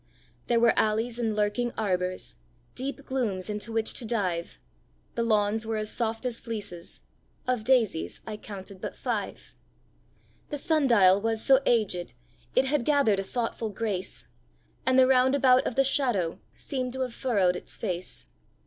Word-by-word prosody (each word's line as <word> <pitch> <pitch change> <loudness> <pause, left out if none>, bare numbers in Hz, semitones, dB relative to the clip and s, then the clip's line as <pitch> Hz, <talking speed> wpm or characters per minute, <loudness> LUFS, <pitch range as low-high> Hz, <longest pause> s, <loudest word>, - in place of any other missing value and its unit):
There 235 -1 +3
were 235 0 +5
alleys 225 +2 +1
and 225 -3 0
lurking 210 +3 0
arbours 185 - -1 0.4
Deep 275 +2 -4
glooms 215 -7 -2
into 210 +2 -4
which 225 0 0
to - - -3
dive; 185 -7 -2 0.6
The 235 - -1
lawns 215 -1 +2
were 225 0 -2
as 215 0 -2
soft 225 0 -2
as 245 -2 -1
fleeces 205 -7 -7 0.4
Of 250 -3 0
daisies 225 -9 +2
I 215 -1 -5
counted 195 -2 -9
but - - -5
five. - - -4 1.0
The 295 - -3
sun 305 -1 +2
dial 200 -5 +5
was 225 0 0
so 265 -1 +7
aged 185 - +1 0.4
It 255 - +4
had 275 -1 +1
gathered 275 -8 +3
a - - -1
thoughtful 230 +1 -3
grace; 200 -3 -3 0.6
And 260 0 +4
the 260 - +8
round 260 +1 +4
about 255 -2 +4
of 235 - -3
the 270 - +4
shadow 245 - 0
Seemed 255 -3 -4
to 260 - -4
have 250 -2 -2
furrowed 200 -10 +1
its - - -5
face. 180 - -4
225 Hz, 160 wpm, -27 LUFS, 200-255 Hz, 1.0 s, the